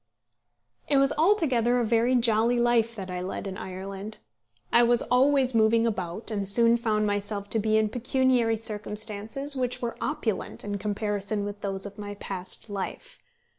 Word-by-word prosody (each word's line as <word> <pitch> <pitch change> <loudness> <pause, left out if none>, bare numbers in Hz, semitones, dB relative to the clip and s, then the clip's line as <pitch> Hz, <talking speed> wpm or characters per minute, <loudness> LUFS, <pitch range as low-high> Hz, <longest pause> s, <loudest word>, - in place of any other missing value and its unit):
It 285 - +4
was 275 +1 +3
altogether 265 - +3
a 240 - +1
very 235 +3 +2
jolly 230 0 +3
life 235 -1 +2
that 190 -3 -6
I 180 0 -3
led 185 +2 -5
in 195 -1 -5
Ireland. 195 +3 -7 0.6
I 235 - +7
was 240 0 +3
always 260 0 +3
moving 225 +1 +4
about, 190 -1 -3
and 200 -2 -2
soon 230 +3 +5
found 215 -3 0
myself 205 0 -2
to 225 - +1
be 215 +1 +2
in 220 0 +3
pecuniary 245 -1 +1
circumstances 215 +5 -4
which 250 -1 -2
were 235 -1 -3
opulent 235 -8 -2
in 205 -1 -3
comparison 205 0 -2
with 205 0 -6
those 195 -1 -3
of 200 +1 -9
my 205 0 -6
past 190 +1 -3
life. 205 - -6
220 Hz, 165 wpm, -27 LUFS, 205-240 Hz, 0.6 s, I